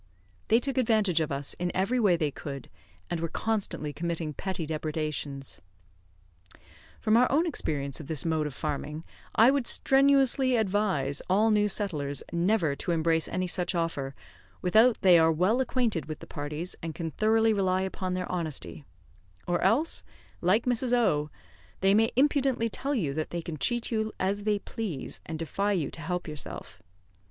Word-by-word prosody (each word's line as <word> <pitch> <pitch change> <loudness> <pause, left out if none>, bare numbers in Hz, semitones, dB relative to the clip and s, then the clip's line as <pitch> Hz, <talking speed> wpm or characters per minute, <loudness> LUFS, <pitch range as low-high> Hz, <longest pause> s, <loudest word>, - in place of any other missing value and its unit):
They 225 - +5
took 270 +1 -1
advantage 215 -8 +2
of 155 -2 -1
us 140 0 -1
in 175 0 -1
every 195 +7 +1
way 200 -6 +4
they 155 -4 -1
could, 140 -2 -8 0.4
and 175 - -1
were 165 - -1
constantly 195 -6 -2
committing 165 0 -3
petty 185 0 -4
depredations. 150 -3 -3 1.4
From 215 - +2
our 245 +1 +4
own 310 +5 +3
experience 140 - -1
of 155 - -9
this 155 -1 0
mode 160 -2 0
of 140 - -7
farming, 150 +1 -4 0.3
I 230 +4 +7
would 275 -3 0
strenuously 270 -1 +4
advise 190 - 0
all 210 +4 +4
new 210 -1 +3
settlers 150 -10 -1
never 170 -3 +1
to - - -6
embrace 165 -1 +2
any 185 - -2
such 180 0 -1
offer, 145 -5 -2 0.4
without 220 +6 +4
they 180 -3 +7
are 160 0 +5
well 185 +10 +2
acquainted 235 - -1
with 155 -1 -5
the - - -11
parties, 150 +5 -4
and 165 -2 -5
can 165 -2 -4
thoroughly 220 +4 +3
rely 190 -2 +1
upon 185 -1 -3
their 180 0 -3
honesty; 160 -4 -4 0.6
or 175 -1 0
else, 240 - +2 0.4
like 190 +6 +2
Mrs. 245 0 0
O, 170 -12 +2 0.5
they 195 +1 +4
may 225 +2 +4
impudently 270 -3 +2
tell 280 +5 -2
you 160 - -1
that 155 +1 -3
they 170 -1 -4
can 160 -2 -5
cheat 240 - 0
you 220 -1 -1
as 200 +2 -1
they 210 -1 +2
please, 200 - -6
and 160 - -4
defy 195 +6 -1
you 160 -8 -1
to 160 - -10
help 180 +2 -3
yourself. 150 -2 -6
180 Hz, 170 wpm, -28 LUFS, 155-220 Hz, 1.4 s, I